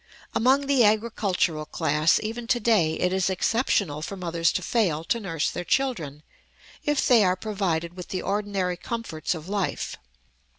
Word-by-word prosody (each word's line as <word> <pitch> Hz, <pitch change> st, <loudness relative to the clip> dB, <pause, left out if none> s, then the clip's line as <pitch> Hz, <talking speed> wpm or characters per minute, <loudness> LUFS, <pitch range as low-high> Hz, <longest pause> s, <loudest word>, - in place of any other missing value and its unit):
Among 265 Hz, +5 st, +3 dB
the 275 Hz, -3 st, +4 dB
agricultural 205 Hz, -7 st, +1 dB
class, 150 Hz, +2 st, +2 dB
even 230 Hz, +2 st, -5 dB
to 240 Hz, 0 st, +2 dB
day, 205 Hz, -9 st, +2 dB
it 180 Hz, +1 st, +1 dB
is 190 Hz, 0 st, +1 dB
exceptional 190 Hz, -, 0 dB
for 195 Hz, +5 st, -5 dB
mothers 170 Hz, -2 st, 0 dB
to -, -, -2 dB
fail 175 Hz, -10 st, +1 dB
to 235 Hz, +7 st, 0 dB
nurse 165 Hz, -7 st, -2 dB
their 175 Hz, -, -4 dB
children, 170 Hz, -, -1 dB, 0.6 s
if 295 Hz, -2 st, +1 dB
they 235 Hz, -4 st, +6 dB
are 185 Hz, -1 st, +3 dB
provided 180 Hz, -5 st, -2 dB
with 180 Hz, -1 st, -8 dB
the 185 Hz, -, -4 dB
ordinary 195 Hz, -3 st, -1 dB
comforts 185 Hz, -6 st, -3 dB
of 160 Hz, +1 st, -9 dB
life. 200 Hz, -1 st, -2 dB
190 Hz, 160 wpm, -25 LUFS, 165-225 Hz, 0.6 s, they